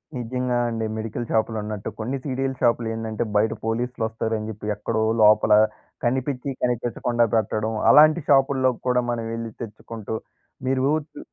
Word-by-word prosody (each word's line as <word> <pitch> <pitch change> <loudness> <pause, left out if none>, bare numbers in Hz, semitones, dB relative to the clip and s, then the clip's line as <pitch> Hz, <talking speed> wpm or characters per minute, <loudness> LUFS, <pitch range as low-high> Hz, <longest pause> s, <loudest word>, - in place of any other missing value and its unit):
నిజంగా 125 +1 -2
అండి. 115 -1 -2
మెడికల్ 110 +2 -4
షాప్‌‌లున్నట్టు, 110 -2 -1
కొన్ని 125 +5 -2
సీడీల 135 -1 -2
షాపులేందంటే, 115 -2 0
బయట 110 +2 +3
పోలీస్‌లు 120 +1 -2
వొస్తారని 110 -1 -3
చెప్పి, 105 -1 -8
ఎక్కడో 110 +2 -2 0.2
లోపల 105 0 +6 0.5
కనిపించి, 130 +2 -1
కనిపించకుండా 120 0 0
పెట్టడం. 110 0 0 0.2
అలాంటి 155 +2 +7
షాపుల్లో 135 -1 +4 0.2
కూడా 125 0 +3
మనం 115 -1 -2
ఎళ్లి 115 -1 -5
తెచ్చుకుంటూ, 110 -1 -6 0.5
మీరు 130 0 +1 0.3
చు - - -10
115 Hz, 125 wpm, -23 LUFS, 110-125 Hz, 0.5 s, అలాంటి